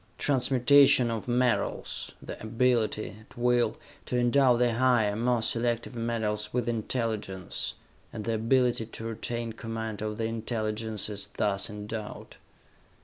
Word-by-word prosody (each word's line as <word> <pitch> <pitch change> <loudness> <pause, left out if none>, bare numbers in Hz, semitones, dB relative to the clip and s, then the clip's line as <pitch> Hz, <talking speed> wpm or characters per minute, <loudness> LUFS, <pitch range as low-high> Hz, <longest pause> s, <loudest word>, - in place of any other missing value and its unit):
Transmutation 135 -1 +5
of 115 0 -4
metals... 125 0 0
the - - -8
ability, 110 -2 0
at 110 - -19
will, 120 -2 +2 0.3
to 125 - 0
endow 125 +1 +4
the 120 -1 +2
higher, 120 -4 +3
more 120 +1 +1
selective 120 +1 0
metals 110 -3 -2
with 125 -1 -1
intelligence... 110 -5 -2 0.4
and 110 - -6
the 115 +2 -1
ability 120 0 +2
to 115 - -7
retain 115 +1 -3
command 110 -2 -5
of 105 0 -3
the 115 - -1
intelligences 110 -2 -3
thus 100 -1 0
endowed. 105 +1 -7
115 Hz, 125 wpm, -28 LUFS, 110-120 Hz, 0.4 s, Transmutation